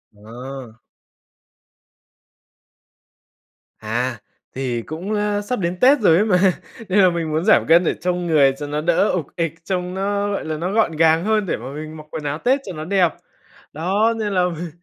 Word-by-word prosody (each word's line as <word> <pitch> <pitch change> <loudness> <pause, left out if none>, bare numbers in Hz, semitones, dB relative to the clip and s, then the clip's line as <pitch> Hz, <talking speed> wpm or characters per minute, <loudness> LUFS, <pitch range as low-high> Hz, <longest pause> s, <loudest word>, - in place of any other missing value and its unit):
À. 120 +2 -10 3.0
À, 120 +2 -2 0.4
thì 125 -3 -2
cũng, 175 - -5
a, 205 0 0
sắp 230 +2 -3
đến 175 0 -2
Tết 270 +5 +5
rồi 180 -7 +5
ấy 210 - +3
mà, 190 -5 +3 0.5
nên 195 +2 +3
là 185 -2 +6
mình 165 -2 -3
muốn 160 +4 -1
giảm 220 - +5
cân 170 +2 +6
để - - +1
trông 180 0 -1
người 140 -4 +4
cho 145 0 -5
nó 150 +1 -2
đỡ 175 +5 +2
ục 165 -6 -2
ịch, 165 -2 -1
trông 180 0 -3
nó, 200 +1 -1
gọi 200 - -3
là, 155 -1 -3
nó 175 +4 -3
gọn 215 -5 +2
gàng 160 +1 +3
hơn 215 0 +1
để - - -2
mà 125 +4 -8
mình 155 +1 -7
mặc 155 - -11
quần 155 - -5
áo 145 0 -2
Tết 260 - +1
cho 190 - -6
nó 155 -1 -6
đẹp. 185 -2 +3 0.6
Đó, 195 +9 +1
nên 210 -2 -2
là 180 -1 +2
mình 170 +2 -6
170 Hz, 190 wpm, -20 LUFS, 150-200 Hz, 3.0 s, là